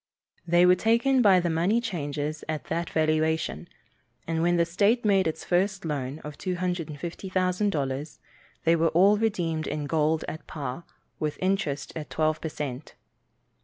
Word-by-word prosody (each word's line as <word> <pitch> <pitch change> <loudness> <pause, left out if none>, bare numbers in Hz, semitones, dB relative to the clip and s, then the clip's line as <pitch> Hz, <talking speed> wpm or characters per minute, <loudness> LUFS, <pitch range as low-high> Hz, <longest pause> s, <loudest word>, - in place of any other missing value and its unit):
They 175 +1 +5
were 180 - +7
taken 235 +7 +3
by 195 -5 +6
the 175 -1 0
money 175 +8 +2
changers 155 -8 -3
at 155 -1 -2
that 170 +1 -2
valuation, 155 - 0 0.6
and 165 0 -1
when 175 +1 +3
the 170 - +3
state 205 +8 +2
made 195 -4 +3
its 160 0 -4
first 190 +1 0
loan 140 -3 -3
of 150 0 -8
$250,000, 175 -3 -2 0.5
they 165 +1 +4
were 165 0 +2
all 195 +6 +5
redeemed 170 -8 -1
in 150 -1 -3
gold 155 +1 +1
at 155 -1 -7
par, 145 +2 -5 0.3
with 150 -1 -2
interest 185 -7 -1
at 155 -2 -6
twelve 155 0 0
per 160 - -3
cent. 145 -2 -6
165 Hz, 150 wpm, -27 LUFS, 155-185 Hz, 0.6 s, were